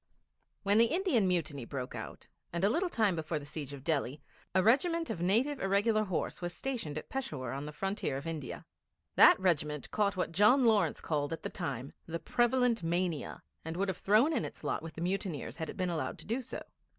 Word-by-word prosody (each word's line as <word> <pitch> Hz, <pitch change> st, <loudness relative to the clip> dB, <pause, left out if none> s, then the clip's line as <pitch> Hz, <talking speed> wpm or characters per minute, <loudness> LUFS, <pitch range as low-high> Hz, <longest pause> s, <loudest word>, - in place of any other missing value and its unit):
When 205 Hz, +1 st, +4 dB
the 230 Hz, -, +7 dB
Indian 310 Hz, -, +2 dB
Mutiny 160 Hz, -7 st, -1 dB
broke 125 Hz, +1 st, -5 dB
out, -, -, -8 dB, 0.2 s
and 170 Hz, +1 st, -2 dB
a 205 Hz, -, +4 dB
little 355 Hz, +8 st, +1 dB
time 215 Hz, -, +2 dB
before 160 Hz, 0 st, -2 dB
the 145 Hz, -, -7 dB
siege 145 Hz, -1 st, -6 dB
of 140 Hz, -2 st, -9 dB
Delhi, 145 Hz, -3 st, -1 dB, 0.4 s
a 190 Hz, -, +5 dB
regiment 330 Hz, -, +3 dB
of 170 Hz, -, -4 dB
Native 240 Hz, +10 st, +2 dB
Irregular 205 Hz, +3 st, +2 dB
Horse 185 Hz, -2 st, -2 dB
was 175 Hz, -1 st, -4 dB
stationed 225 Hz, -, -3 dB
at -, -, -6 dB
Peshawur 155 Hz, -, -4 dB
on 140 Hz, +2 st, -4 dB
the -, -, -5 dB
Frontier 195 Hz, -4 st, -2 dB
of 140 Hz, -, -7 dB
India. 160 Hz, -5 st, -5 dB, 0.5 s
That -, -, +8 dB
regiment 150 Hz, -6 st, 0 dB
caught 200 Hz, -3 st, +1 dB
what 180 Hz, -, -1 dB
John 210 Hz, +9 st, +5 dB
Lawrence 205 Hz, -9 st, +3 dB
called 150 Hz, -1 st, -1 dB
at 165 Hz, -, -6 dB
the -, -, -4 dB
time 140 Hz, -7 st, -4 dB
'the 165 Hz, 0 st, -2 dB
prevalent 240 Hz, +3 st, +2 dB
mania,' 170 Hz, -2 st, -2 dB, 0.2 s
and 160 Hz, +1 st, -5 dB
would 195 Hz, +1 st, 0 dB
have 185 Hz, -, -2 dB
thrown 220 Hz, +11 st, +4 dB
in -, -, +1 dB
its -, -, -7 dB
lot 145 Hz, -, -1 dB
with 165 Hz, 0 st, -8 dB
the 165 Hz, -, -6 dB
mutineers 180 Hz, -4 st, -2 dB
had 160 Hz, -3 st, -4 dB
it -, -, -7 dB
been 185 Hz, -2 st, 0 dB
allowed 165 Hz, -, -2 dB
to -, -, -11 dB
do 235 Hz, +5 st, -1 dB
so. 255 Hz, -, -6 dB
180 Hz, 210 wpm, -32 LUFS, 155-225 Hz, 0.5 s, That